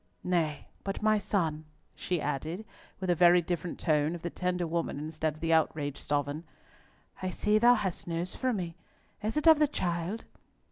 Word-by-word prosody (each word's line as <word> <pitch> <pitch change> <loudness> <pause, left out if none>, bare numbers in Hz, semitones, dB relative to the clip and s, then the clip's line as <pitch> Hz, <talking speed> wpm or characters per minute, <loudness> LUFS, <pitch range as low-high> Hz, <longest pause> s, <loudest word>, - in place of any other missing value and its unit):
Nay 165 -5 0 0.2
but, 195 +1 -4
my 215 0 +4
son," 160 -7 -1 0.3
she 180 -2 -2
added, 155 +8 -3 0.3
with 185 -1 0
a - - +5
very 175 +1 +6
different 175 0 -3
tone 155 0 +2
of 170 - -9
the 175 - -3
tender 180 -1 -1
woman 165 -2 -2
instead 155 +1 -2
of - - -15
the 165 0 +2
outraged 150 -3 +1
sovereign, 145 +2 -1 0.8
"I 185 - -1
see 210 +3 +2
thou 240 +2 +7
hast 190 -7 -3
news 170 +2 -2
for 260 -1 0
me. 180 -7 -3 0.5
Is 215 +6 -2
it 300 - 0
of 320 -2 +8
the 300 - +5
child?" 175 - -2
175 Hz, 180 wpm, -30 LUFS, 155-195 Hz, 0.8 s, of